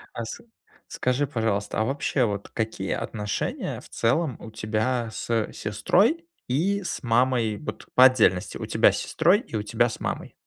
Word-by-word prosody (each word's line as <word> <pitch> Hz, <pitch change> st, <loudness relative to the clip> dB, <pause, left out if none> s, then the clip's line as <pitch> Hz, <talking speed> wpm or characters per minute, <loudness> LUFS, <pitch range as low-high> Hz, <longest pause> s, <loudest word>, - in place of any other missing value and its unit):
А 115 Hz, -, -3 dB
с 110 Hz, -, -7 dB, 0.5 s
скажи, 125 Hz, +3 st, 0 dB
пожалуйста, 110 Hz, -6 st, -1 dB
а 110 Hz, -, +2 dB
вообще, 135 Hz, 0 st, 0 dB
вот, 100 Hz, -2 st, -3 dB
какие 110 Hz, -4 st, -3 dB
отношения 105 Hz, -2 st, -3 dB
в -, -, -15 dB
целом 135 Hz, +3 st, +1 dB
у 110 Hz, -, -10 dB
тебя 110 Hz, +2 st, -1 dB
с 115 Hz, -2 st, -1 dB
сестрой 195 Hz, -, +1 dB, 0.2 s
и 190 Hz, +10 st, 0 dB
с -, -, -4 dB
мамой? 120 Hz, -2 st, +2 dB
Вот, 150 Hz, -, -7 dB
по 130 Hz, -, +9 dB
отдельности, 110 Hz, -8 st, +3 dB
у -, -, -5 dB
тебя -, -, +4 dB
с -, -, -3 dB
сестрой, 175 Hz, +6 st, +3 dB
и 115 Hz, -, -9 dB
у 105 Hz, -, -1 dB
тебя 105 Hz, -, +2 dB
с -, -, -7 dB
мамой. -, -, -4 dB
115 Hz, 170 wpm, -25 LUFS, 110-135 Hz, 0.5 s, по